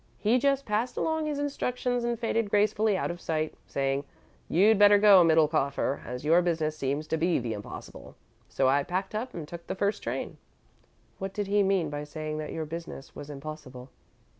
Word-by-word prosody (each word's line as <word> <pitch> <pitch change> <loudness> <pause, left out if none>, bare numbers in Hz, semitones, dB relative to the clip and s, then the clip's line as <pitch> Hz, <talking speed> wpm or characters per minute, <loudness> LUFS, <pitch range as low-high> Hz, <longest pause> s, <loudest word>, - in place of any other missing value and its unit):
He 230 +4 +2
just 275 +1 +1
passed 225 +4 -1
along 320 -1 0
his 295 -1 -2
instructions 250 -4 -1
and 235 0 -1
faded 230 -2 0
gracefully 210 0 +2
out - - -1
of 175 0 -9
sight, 155 -1 -2
saying: 135 0 -1 0.5
'You'd 205 +4 +4
better 205 0 +8
go, 200 -3 +7
Middlekauffer, 155 -4 +2
as 125 +3 -6
your 165 +3 +5
business 160 -3 0
seems 140 +1 -2
to 160 - -1
be 170 +2 +2
the 120 -2 -2
impossible,' 105 -1 -9 0.3
so 135 - +1
I 140 +2 +4
packed 185 +6 -3
up 240 +4 -4
and 160 -4 -6
took 170 +1 -9
the - - -3
first 200 +2 0
train." - - -4 0.8
"What 195 0 -4
did 205 - -1
he 205 +1 +2
mean 190 -6 +1
by 145 0 -4
saying 155 +1 -5
that 150 - -5
your 160 - -3
business 165 -3 -8
was 145 - -8
impossible?" 135 -3 -9
170 Hz, 190 wpm, -28 LUFS, 150-210 Hz, 0.8 s, better